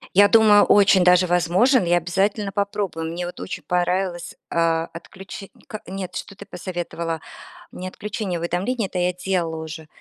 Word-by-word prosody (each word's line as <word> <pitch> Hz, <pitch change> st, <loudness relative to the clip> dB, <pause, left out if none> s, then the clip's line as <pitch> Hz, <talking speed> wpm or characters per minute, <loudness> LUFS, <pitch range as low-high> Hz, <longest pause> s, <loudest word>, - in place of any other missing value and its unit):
Я 205 Hz, +1 st, +7 dB
думаю, 210 Hz, -1 st, +6 dB
очень 195 Hz, -2 st, +5 dB
даже 180 Hz, 0 st, +5 dB
возможен. 180 Hz, -, +3 dB
Я 175 Hz, +1 st, +3 dB
обязательно 195 Hz, +4 st, -1 dB
попробую. 200 Hz, -5 st, -2 dB
Мне, 175 Hz, +1 st, -4 dB
вот, 175 Hz, -, -8 dB
очень -, -, -6 dB
понравилось. 180 Hz, 0 st, -1 dB
А, 165 Hz, 0 st, +1 dB
отключить, 190 Hz, +3 st, -10 dB, 0.2 s
как 215 Hz, -, -8 dB
нет, 185 Hz, -1 st, -6 dB
что 200 Hz, -, -6 dB
ты 200 Hz, +1 st, -12 dB
посоветовала? 170 Hz, -2 st, -5 dB, 0.5 s
Мне 185 Hz, -, -7 dB
отключение 205 Hz, -2 st, -4 dB
уведомления 195 Hz, +7 st, -1 dB
это 185 Hz, -, -5 dB
я 180 Hz, 0 st, +1 dB
делала 175 Hz, -3 st, -2 dB
уже. 160 Hz, 0 st, -8 dB
180 Hz, 155 wpm, -22 LUFS, 175-200 Hz, 0.5 s, Я